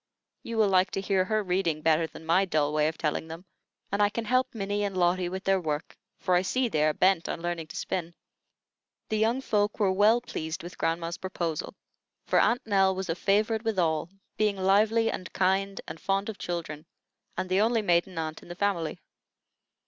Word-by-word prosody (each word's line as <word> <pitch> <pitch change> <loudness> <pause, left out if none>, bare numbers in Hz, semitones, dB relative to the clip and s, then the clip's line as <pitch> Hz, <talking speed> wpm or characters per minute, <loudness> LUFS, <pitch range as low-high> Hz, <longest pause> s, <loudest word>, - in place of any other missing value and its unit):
You 230 -1 -5
will 215 -2 +4
like 185 -1 +3
to - - -1
hear 195 -1 +1
her 215 +2 0
reading 180 -5 0
better 160 0 +3
than 160 - -12
my 170 +4 +4
dull 150 -5 0
way 150 0 +3
of 160 - -3
telling 155 +1 -2
them, 165 +3 -9 0.5
and 200 +1 +1
I 205 - +5
can 225 +2 -4
help 255 +3 +2
Minnie 205 0 -1
and 195 -2 -2
Lotty 175 0 +2
with 190 +1 -5
their 195 -1 +2
work, 150 -2 -3 0.2
for 185 - 0
I 180 - +5
see 255 +7 0
they 155 -9 +1
are 155 - +2
bent 185 -2 +2
on - - -3
learning 170 -1 -3
to - - -11
spin." 170 -1 -3 0.9
The 215 - 0
young 230 +4 +2
folk 210 -4 0
were 200 -3 +3
well 210 +5 +4
pleased 160 -10 -5
with 175 0 -10
grandma's 165 +1 -1
proposal; 170 -4 -3 0.5
for - - +3
Aunt 245 +2 +2
Nell 195 -3 +3
was 190 -1 -4
a 165 - 0
favorite 215 +4 +1
with 225 -3 -1
all, 160 -2 +1 0.3
being 210 -2 +1
lively 215 +4 +3
and 185 - -6
kind 195 +1 +1
and 160 - -7
fond 195 +2 0
of 215 - -7
children, 165 -3 -5 0.5
and 185 +1 -2
the 185 +2 +2
only 225 0 +2
maiden 175 -1 +1
aunt 160 -1 -4
in - - -15
the 175 - -6
family. 180 -4 -1
190 Hz, 205 wpm, -28 LUFS, 165-205 Hz, 0.9 s, I